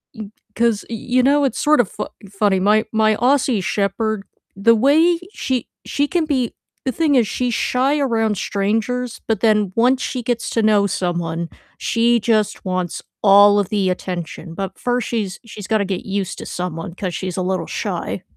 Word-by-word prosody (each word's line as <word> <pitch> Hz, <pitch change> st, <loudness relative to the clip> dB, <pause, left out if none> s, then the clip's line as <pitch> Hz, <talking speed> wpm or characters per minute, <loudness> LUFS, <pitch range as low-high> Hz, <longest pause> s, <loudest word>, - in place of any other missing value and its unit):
y 215 Hz, -3 st, -7 dB, 0.3 s
'cause, 230 Hz, -2 st, +1 dB
y -, -, -5 dB
you 250 Hz, +3 st, 0 dB
know, 285 Hz, +2 st, +4 dB
it's 270 Hz, -, 0 dB
sort 305 Hz, -1 st, +3 dB
of 225 Hz, -7 st, +2 dB
fu -, -, -5 dB, 0.2 s
funny, 200 Hz, -1 st, +1 dB
my 210 Hz, +3 st, +3 dB
my 220 Hz, -1 st, +3 dB
Aussie 250 Hz, -4 st, +2 dB
Shepherd, 210 Hz, +1 st, -1 dB, 0.3 s
the 225 Hz, +4 st, +4 dB
way 315 Hz, +8 st, +4 dB
she 255 Hz, -3 st, -2 dB, 0.2 s
she 285 Hz, 0 st, 0 dB
can 345 Hz, 0 st, 0 dB
be 260 Hz, -6 st, -1 dB, 0.3 s
the 260 Hz, -, +1 dB
thing 300 Hz, +1 st, +1 dB
is 240 Hz, -4 st, +4 dB
she's 245 Hz, +3 st, -1 dB
shy 265 Hz, +6 st, +1 dB
around 225 Hz, -6 st, +1 dB
strangers, 225 Hz, +6 st, -1 dB
but 225 Hz, -3 st, 0 dB
then 210 Hz, -4 st, +3 dB
once 250 Hz, +3 st, +3 dB
she 250 Hz, -2 st, -3 dB
gets 240 Hz, -1 st, -2 dB
to 225 Hz, -, 0 dB
know 210 Hz, -2 st, +4 dB
someone, 170 Hz, -3 st, -2 dB, 0.3 s
she 235 Hz, +1 st, +2 dB
just 215 Hz, -2 st, 0 dB
wants 185 Hz, -2 st, -2 dB, 0.2 s
all 205 Hz, 0 st, +7 dB
of 200 Hz, -, -1 dB
the 200 Hz, -3 st, +1 dB
attention, 180 Hz, -2 st, -5 dB
but 195 Hz, +2 st, -5 dB
first 245 Hz, -1 st, -1 dB
she's 205 Hz, -6 st, -3 dB
she's 210 Hz, -3 st, -9 dB
gotta 215 Hz, -3 st, +1 dB
get 185 Hz, -2 st, -4 dB
used 195 Hz, -1 st, -3 dB
to -, -, -7 dB
someone 170 Hz, -1 st, -5 dB
'cause 185 Hz, -2 st, -4 dB
she's 185 Hz, -1 st, -4 dB
a -, -, 0 dB
little 185 Hz, 0 st, -2 dB
shy. -, -, -4 dB
215 Hz, 185 wpm, -20 LUFS, 195-245 Hz, 0.3 s, all